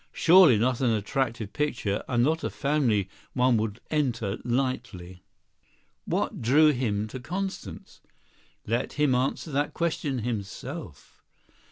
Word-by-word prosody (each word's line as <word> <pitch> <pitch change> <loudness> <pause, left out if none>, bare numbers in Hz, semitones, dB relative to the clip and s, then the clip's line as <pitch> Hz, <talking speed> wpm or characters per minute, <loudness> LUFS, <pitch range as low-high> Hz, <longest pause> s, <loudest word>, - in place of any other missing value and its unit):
Surely 170 - +6
not 120 +3 +1
an 125 - +3
attractive 115 0 -1
picture 120 -9 -1
and 120 -1 +2
not 160 +4 +1
a - - -1
family 135 -9 +1 0.3
one 125 -1 +3
would 110 0 -2
enter 120 -9 -1
lightly. 115 -8 -3 0.8
What - - -2
drew 150 +7 +5
him 110 -6 -1
to 130 - -7
Constance? 190 +9 -6 0.6
Let 115 +4 -1
him 150 -3 +2
answer 130 +5 -1
that 145 +1 -1
question 155 -5 -1
himself. 115 - -6
125 Hz, 125 wpm, -27 LUFS, 110-145 Hz, 0.8 s, Surely